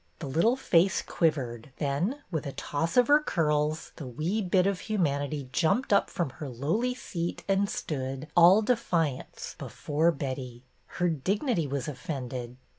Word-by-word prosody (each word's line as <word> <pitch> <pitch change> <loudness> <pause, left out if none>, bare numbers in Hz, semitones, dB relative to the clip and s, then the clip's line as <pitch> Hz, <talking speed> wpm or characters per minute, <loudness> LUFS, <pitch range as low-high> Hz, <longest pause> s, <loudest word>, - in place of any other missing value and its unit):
The 165 - -6
little 165 - +2
face 185 -7 +3
quivered, 130 -8 -1
then 170 - -1
with 160 -4 -2
a 140 - -5
toss 165 +6 -2
of 245 -1 +6
her 290 +1 +7
curls 155 - 0
the 145 - -6
wee 160 - -1
bit 185 -1 +2
of 195 -2 +1
humanity 145 - -1
jumped 185 - +2
up 200 - +3
from 165 -7 -2
her 145 +2 -7
lowly 170 - -1
seat 170 -8 -4
and 195 +1 +2
stood, 140 - -4
all 180 +5 +7
defiance, 170 - -1
before 155 +3 0
Betty. 130 -4 -5 0.3
Her 175 - +2
dignity 180 - 0
was 135 -2 -3
offended. 125 -3 -5
160 Hz, 150 wpm, -28 LUFS, 140-195 Hz, 0.3 s, her